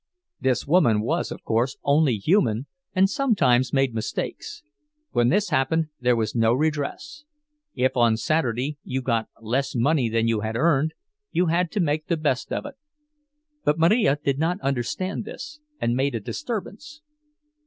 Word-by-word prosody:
This 130 Hz, -2 st, 0 dB
woman 130 Hz, -10 st, +3 dB
was, 160 Hz, +10 st, -1 dB
of -, -, -8 dB
course, 115 Hz, +3 st, 0 dB
only 140 Hz, -4 st, +3 dB
human, 125 Hz, -, +2 dB, 0.3 s
and 190 Hz, +1 st, +5 dB
sometimes 195 Hz, -, +2 dB
made 135 Hz, -3 st, +1 dB
mistakes; 225 Hz, -, -4 dB, 0.5 s
when 120 Hz, 0 st, +2 dB
this 205 Hz, +6 st, +2 dB
happened, 155 Hz, +4 st, +1 dB
there 125 Hz, -1 st, +3 dB
was 110 Hz, -2 st, -1 dB
no 115 Hz, -1 st, +3 dB
redress—if 295 Hz, -, -3 dB
on 120 Hz, -3 st, +3 dB
Saturday 145 Hz, -1 st, -1 dB
you 130 Hz, 0 st, -3 dB
got 115 Hz, -3 st, 0 dB
less 125 Hz, +5 st, -2 dB
money 130 Hz, 0 st, +2 dB
than 115 Hz, 0 st, +1 dB
you 115 Hz, -2 st, +1 dB
had 110 Hz, +1 st, -3 dB
earned, 155 Hz, +2 st, +2 dB, 0.3 s
you 180 Hz, -, +1 dB
had 175 Hz, 0 st, +1 dB
to -, -, -1 dB
make 155 Hz, -3 st, 0 dB
the 170 Hz, -, 0 dB
best 145 Hz, -5 st, -1 dB
of -, -, -2 dB
it. 290 Hz, -, -7 dB, 0.9 s
But 150 Hz, -, +2 dB
Marija 165 Hz, -, +3 dB
did 140 Hz, 0 st, +1 dB
not 175 Hz, +4 st, 0 dB
understand 140 Hz, -, -2 dB
this, 300 Hz, +7 st, -9 dB, 0.2 s
and 120 Hz, +1 st, 0 dB
made 135 Hz, 0 st, 0 dB
a -, -, -1 dB
disturbance. 250 Hz, -, -6 dB
140 Hz, 155 wpm, -24 LUFS, 120-180 Hz, 0.9 s, and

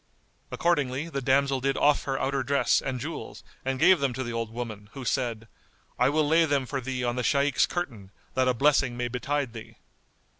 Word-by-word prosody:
Accordingly 150 Hz, -3 st, 0 dB
the 140 Hz, -4 st, -3 dB
damsel 135 Hz, +1 st, +2 dB
did 135 Hz, +1 st, 0 dB
off 145 Hz, 0 st, +3 dB
her 135 Hz, -1 st, -1 dB
outer 135 Hz, 0 st, 0 dB
dress 140 Hz, +2 st, +2 dB
and 130 Hz, -2 st, -3 dB
jewels 150 Hz, +4 st, -7 dB, 0.2 s
and 135 Hz, 0 st, -1 dB
gave 175 Hz, +5 st, +5 dB
them 140 Hz, -3 st, 0 dB
to 130 Hz, -, -3 dB
the 120 Hz, -1 st, -5 dB
old 115 Hz, -1 st, -2 dB
woman, 110 Hz, -3 st, -6 dB
who 135 Hz, -2 st, -7 dB
said, 115 Hz, -4 st, -1 dB, 0.5 s
"I -, -, +4 dB
will 150 Hz, +1 st, +2 dB
lay 165 Hz, +2 st, +4 dB
them 140 Hz, -3 st, 0 dB
for 135 Hz, +1 st, -3 dB
thee 130 Hz, 0 st, -3 dB
on 120 Hz, 0 st, -1 dB
the 125 Hz, -, -1 dB
Shaykh's 140 Hz, 0 st, +2 dB
curtain, 120 Hz, -, -5 dB, 0.2 s
that 130 Hz, 0 st, +2 dB
a 125 Hz, -, +2 dB
blessing 135 Hz, -2 st, +2 dB
may 120 Hz, 0 st, -2 dB
betide 135 Hz, +1 st, -2 dB
thee." 115 Hz, -2 st, -10 dB
135 Hz, 200 wpm, -27 LUFS, 125-145 Hz, 0.5 s, gave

